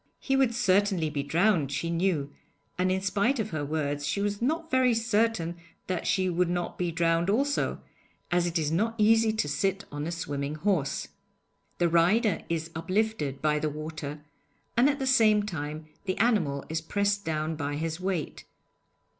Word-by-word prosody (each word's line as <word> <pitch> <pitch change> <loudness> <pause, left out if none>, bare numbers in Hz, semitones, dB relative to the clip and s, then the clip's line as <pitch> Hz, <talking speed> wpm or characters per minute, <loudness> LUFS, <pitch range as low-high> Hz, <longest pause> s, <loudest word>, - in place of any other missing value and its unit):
He 270 - 0
would 260 -4 +2
certainly 195 -7 +2
be 145 -1 -1
drowned, 160 0 +2
she 165 +4 -2
knew, 165 -5 0 0.4
and 185 +1 +1
in 190 0 0
spite 200 +7 +1
of 215 -3 -2
her 155 -2 -2
words 145 -1 -2
she 155 +6 -1
was 205 +1 -1
not 320 +6 -1
very 255 -2 +4
certain 225 -6 +1 0.3
that 185 -2 -2
she 185 -1 +2
would 180 0 +1
not 175 0 -2
be 175 -1 -1
drowned 165 +1 +1
also, 280 +7 +1 0.5
as 175 0 +2
it 175 0 -1
is 155 -2 0
not 220 +7 0
easy 225 +1 +4
to 215 -9 0
sit 195 +5 -1
on 145 +1 -4
a - - -3
swimming 145 -3 -3
horse. 155 -4 -1 0.7
The 175 - +3
rider 180 +6 +3
is 165 0 -2
uplifted 185 -5 -1
by 150 0 +2
the 155 0 -1
water, 150 -1 -6 0.5
and 245 +4 +5
at 285 - 0
the 270 - -2
same 220 -5 +4
time 155 -5 -5 0.2
the 185 -1 -1
animal 175 - +1
is 160 0 -2
pressed 200 +4 0
down 155 -1 -2
by 145 -1 -3
his 160 +2 -3
weight. 185 -4 -3
175 Hz, 175 wpm, -28 LUFS, 155-215 Hz, 0.7 s, and